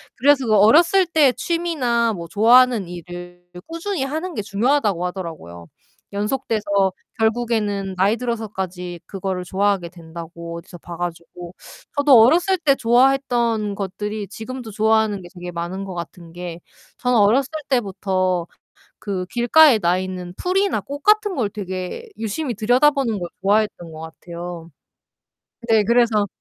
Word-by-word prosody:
그래서 275 Hz, +1 st, +3 dB
그 215 Hz, -, +3 dB
어렸을 340 Hz, -, +5 dB
때 310 Hz, -5 st, +4 dB
취미나 265 Hz, -8 st, 0 dB
뭐 170 Hz, -4 st, -7 dB
좋아하는 230 Hz, 0 st, +4 dB
일을 175 Hz, 0 st, -9 dB, 0.2 s
꾸준히 335 Hz, -1 st, -3 dB
하는 315 Hz, +6 st, -4 dB
게 -, -, -2 dB
중요하다고 210 Hz, -3 st, +1 dB
하더라고요. 160 Hz, -, -8 dB, 0.5 s
연속돼서 215 Hz, +1 st, -2 dB, 0.6 s
결국에는 220 Hz, -4 st, 0 dB
나이 200 Hz, +5 st, +2 dB
들어서까지 190 Hz, -7 st, -4 dB
그거를 190 Hz, -1 st, -4 dB
좋아하게 195 Hz, -1 st, 0 dB
된다고 170 Hz, 0 st, -9 dB
어디서 175 Hz, +1 st, -11 dB
봐 170 Hz, -1 st, -9 dB
가지고 175 Hz, 0 st, -6 dB, 0.4 s
저도 280 Hz, -5 st, +7 dB
어렸을 350 Hz, +10 st, +4 dB
때 290 Hz, -4 st, +3 dB
좋아했던 240 Hz, -4 st, +2 dB
것들이 205 Hz, +2 st, -4 dB
지금도 235 Hz, +1 st, -7 dB
좋아하는 220 Hz, -1 st, +1 dB
게 175 Hz, -, -12 dB
되게 175 Hz, -1 st, -7 dB
많은 175 Hz, +3 st, -5 dB
거 190 Hz, -2 st, -7 dB
같은 170 Hz, 0 st, -8 dB
게 175 Hz, -1 st, -7 dB, 0.4 s
저는 250 Hz, -1 st, +2 dB
어렸을 235 Hz, +7 st, +3 dB, 0.2 s
때부터 185 Hz, -7 st, 0 dB, 0.5 s
그 190 Hz, -3 st, -3 dB
길가에 240 Hz, +3 st, +5 dB
나 175 Hz, 0 st, +2 dB
있는 185 Hz, -1 st, -6 dB
풀이나 375 Hz, -, 0 dB
꽃 280 Hz, +9 st, -7 dB
같은 425 Hz, -2 st, +3 dB
걸 230 Hz, -8 st, 0 dB
되게 190 Hz, -, -6 dB
유심히 240 Hz, +5 st, -3 dB
들여다보는 245 Hz, +1 st, +2 dB
걸 175 Hz, -1 st, -5 dB
좋아했던 200 Hz, -4 st, 0 dB
것 155 Hz, -, -9 dB
같아요. 170 Hz, +1 st, -8 dB, 1.0 s
네, 220 Hz, -2 st, +5 dB
그래서 230 Hz, -2 st, +3 dB
210 Hz, 320 characters per minute, -21 LUFS, 180-250 Hz, 1.0 s, 저도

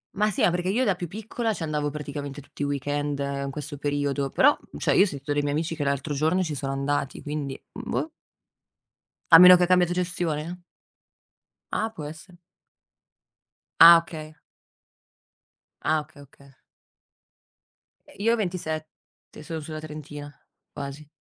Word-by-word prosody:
Ma 210 Hz, +2 st, +2 dB
sì, 200 Hz, -, -3 dB
ma -, -, +5 dB
perché 175 Hz, +1 st, -2 dB
io 230 Hz, +7 st, +1 dB
da 200 Hz, -7 st, +2 dB
più 175 Hz, -1 st, -5 dB
piccola, 220 Hz, +4 st, -3 dB
ci 170 Hz, -, -5 dB
andavo 150 Hz, -1 st, -1 dB
praticamente 145 Hz, -1 st, -6 dB
tutti 145 Hz, -, -8 dB
i -, -, +1 dB
weekend 145 Hz, +1 st, -2 dB
in 140 Hz, 0 st, -2 dB
questo 145 Hz, +1 st, -6 dB
periodo, 145 Hz, -1 st, -1 dB
però, 290 Hz, -, +4 dB, 0.2 s
cioè -, -, +1 dB
io -, -, +6 dB
ho -, -, +4 dB
sentito 145 Hz, -5 st, -5 dB
dei 145 Hz, 0 st, +1 dB
miei 145 Hz, 0 st, -1 dB
amici 160 Hz, +2 st, -1 dB
che 145 Hz, -3 st, -3 dB
l'altro 140 Hz, +2 st, -1 dB
giorno 160 Hz, +6 st, +1 dB
ci 160 Hz, -4 st, -3 dB
sono 135 Hz, -1 st, -3 dB
andati, 140 Hz, 0 st, -2 dB
quindi, 145 Hz, -2 st, -4 dB
mhmm, -, -, -8 dB
boh. -, -, -1 dB, 1.2 s
A 165 Hz, -, +13 dB
meno 180 Hz, 0 st, +11 dB
che 180 Hz, -, +3 dB
ha -, -, +5 dB
cambiato 180 Hz, -1 st, +3 dB
gestione? 175 Hz, -1 st, -3 dB, 1.1 s
Ah 220 Hz, +1 st, -1 dB
può 160 Hz, -8 st, -9 dB
essere. 165 Hz, +4 st, -11 dB, 1.4 s
Ah 170 Hz, +1 st, +11 dB
okay. 155 Hz, -2 st, -6 dB, 1.5 s
Ah 155 Hz, 0 st, +2 dB
okay 150 Hz, -1 st, -17 dB
okay. 140 Hz, 0 st, -18 dB, 1.7 s
Io 225 Hz, +4 st, +2 dB
ho -, -, +3 dB
27, 160 Hz, -7 st, -6 dB
sono 160 Hz, +1 st, -5 dB
sulla 155 Hz, 0 st, -7 dB
trentina, 150 Hz, -1 st, -8 dB, 0.4 s
quasi. 140 Hz, +1 st, -7 dB
155 Hz, 155 wpm, -25 LUFS, 145-175 Hz, 1.7 s, A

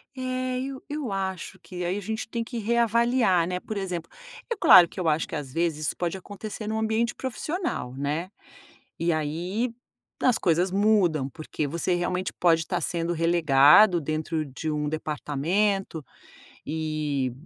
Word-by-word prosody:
É, 255 Hz, 0 st, -2 dB
e 270 Hz, +1 st, -4 dB
eu 295 Hz, -5 st, -3 dB
acho 190 Hz, -1 st, -4 dB
que 180 Hz, -2 st, -6 dB
aí 185 Hz, +3 st, -1 dB
a -, -, -4 dB
gente 220 Hz, +3 st, -4 dB
tem 230 Hz, 0 st, -3 dB
que 235 Hz, +1 st, -7 dB
reavaliar, 235 Hz, -4 st, +2 dB
né, 180 Hz, 0 st, -3 dB
por 215 Hz, -, -5 dB
exemplo, 180 Hz, -4 st, -4 dB, 0.4 s
é -, -, +1 dB
claro 180 Hz, -, +8 dB
que -, -, -9 dB
eu 170 Hz, -, -1 dB
acho 155 Hz, +1 st, +2 dB
que -, -, -7 dB
às 135 Hz, -3 st, -7 dB
vezes 165 Hz, -2 st, -1 dB
isso -, -, -1 dB
pode 175 Hz, +1 st, -2 dB
acontecer 210 Hz, +2 st, -7 dB
em -, -, -2 dB
um 220 Hz, -, -1 dB
ambiente 220 Hz, +2 st, 0 dB
profissional, 285 Hz, -, -3 dB
né. 150 Hz, +6 st, -2 dB, 0.7 s
E 170 Hz, 0 st, +1 dB
aí 175 Hz, +10 st, -2 dB, 0.5 s
as 250 Hz, -3 st, +4 dB
coisas 175 Hz, +1 st, +2 dB
mudam, 190 Hz, -9 st, +2 dB
porque 155 Hz, 0 st, -4 dB
você 170 Hz, +4 st, -1 dB
realmente 180 Hz, +1 st, -1 dB
pode 165 Hz, -2 st, +3 dB
estar 175 Hz, +1 st, -2 dB
sendo 170 Hz, +1 st, -1 dB
relegado 165 Hz, +2 st, +5 dB
dentro 155 Hz, +1 st, -2 dB
de 145 Hz, +4 st, -5 dB
um 150 Hz, -1 st, -1 dB
departamento, 160 Hz, +5 st, -1 dB, 0.6 s
e, 150 Hz, -4 st, -2 dB
180 Hz, 160 wpm, -26 LUFS, 155-215 Hz, 0.7 s, claro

